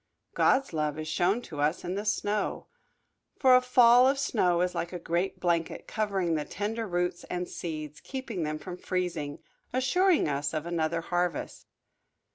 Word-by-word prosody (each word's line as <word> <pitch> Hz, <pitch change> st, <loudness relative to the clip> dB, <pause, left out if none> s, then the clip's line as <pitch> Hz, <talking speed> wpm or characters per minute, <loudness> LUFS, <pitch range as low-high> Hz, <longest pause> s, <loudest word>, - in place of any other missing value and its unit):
God's 270 Hz, -7 st, +2 dB
love 150 Hz, -1 st, -1 dB
is 155 Hz, 0 st, -5 dB
shown 180 Hz, +9 st, +1 dB
to 150 Hz, -8 st, -6 dB
us 150 Hz, +4 st, +1 dB
in 180 Hz, -, -2 dB
the 205 Hz, +2 st, -3 dB
snow. 210 Hz, -1 st, -1 dB, 0.7 s
For 260 Hz, -2 st, +6 dB
a 250 Hz, -, +6 dB
fall 250 Hz, 0 st, +6 dB
of 275 Hz, +1 st, +2 dB
snow 185 Hz, -11 st, +1 dB
is 180 Hz, 0 st, 0 dB
like 170 Hz, -, -3 dB
a 180 Hz, -, -4 dB
great 175 Hz, +2 st, -2 dB
blanket, 170 Hz, -2 st, -1 dB
covering 195 Hz, -6 st, -1 dB
the 155 Hz, -2 st, 0 dB
tender 215 Hz, +6 st, -3 dB
roots 175 Hz, -1 st, -1 dB
and 180 Hz, 0 st, -3 dB
seeds, 155 Hz, -3 st, -6 dB
keeping 260 Hz, -8 st, -5 dB
them 155 Hz, -1 st, -2 dB
from 180 Hz, +3 st, -8 dB
freezing, 180 Hz, -6 st, -3 dB, 0.3 s
assuring 330 Hz, -, +3 dB
us 145 Hz, +1 st, -1 dB
of 155 Hz, 0 st, -2 dB
another 165 Hz, -1 st, -1 dB
harvest. 175 Hz, 0 st, -2 dB
180 Hz, 165 wpm, -28 LUFS, 165-220 Hz, 0.7 s, For